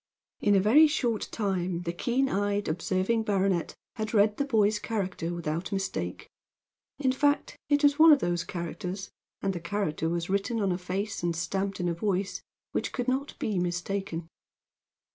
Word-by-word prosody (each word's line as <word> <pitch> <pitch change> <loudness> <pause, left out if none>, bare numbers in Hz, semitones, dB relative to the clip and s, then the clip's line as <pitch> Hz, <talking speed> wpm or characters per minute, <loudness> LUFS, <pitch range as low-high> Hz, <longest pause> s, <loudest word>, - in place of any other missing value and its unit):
In 205 -1 +3
a - - +6
very 255 +11 +7
short 240 -7 0
time 185 -4 -1
the 170 -1 -2
keen 250 +9 +1
eyed, 205 -2 0
observing 185 +7 0
baronet 195 -5 0 0.2
had 220 0 -2
read 210 0 +4
the 280 - 0
boy's 215 -5 +2
character 190 -7 -2
without 170 +1 -3
mistake. 195 -1 -3 0.7
In 265 -3 +2
fact, 285 +2 +1
it 290 0 +3
was 285 +1 +4
one 320 0 +9
of 295 - +8
those 175 -8 -1
characters 180 +2 -5 0.3
and 195 -1 +1
the 175 - -4
character 170 -2 -1
was 170 0 -2
written 200 +4 0
on 200 -3 +1
a 175 - 0
face 190 +3 -3
and 170 -1 0
stamped 195 +4 -2
in 175 - 0
a 170 - +1
voice 190 +2 -1 0.3
which - - -2
could 245 -1 -2
not 265 +3 -1
be 205 -4 -1
mistaken. 175 -1 -2
195 Hz, 170 wpm, -28 LUFS, 175-220 Hz, 0.7 s, one